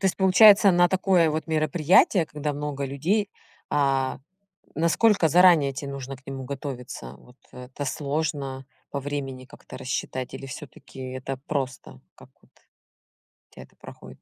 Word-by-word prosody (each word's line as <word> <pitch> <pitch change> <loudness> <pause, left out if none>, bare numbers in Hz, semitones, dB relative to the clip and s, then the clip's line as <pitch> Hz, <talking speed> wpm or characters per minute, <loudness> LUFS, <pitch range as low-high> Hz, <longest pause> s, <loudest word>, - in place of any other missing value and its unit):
То - - -7
есть 185 - 0
получается, 200 +1 +7
на 175 0 +4
такое 185 -3 +2
вот 155 +2 -3
мероприятие, 160 +3 +3
когда 150 -1 -4
много 145 -1 -4
людей, 170 +10 -1 0.4
а, 135 -2 0 0.5
насколько 170 +3 +3
заранее 170 -5 +5
тебе 140 0 -6
нужно 135 -1 -7
к 130 - -24
нему 135 -1 -6
готовиться? 125 - -7
Вот 125 - -20 0.2
это 125 +3 -8
сложно 140 -1 -3 0.3
по 140 - -3
времени 135 -2 -5
как-то 130 +1 -13
рассчитать 130 0 -4
или 135 - -8
всё-таки 135 0 -11
это 130 +1 -5
просто, 130 - -4
как - - -17
вот - - -28
у - - -35 0.7
тебя - - -11
это - - -22
проходит? 65 0 -13
140 Hz, 150 wpm, -25 LUFS, 130-165 Hz, 0.7 s, получается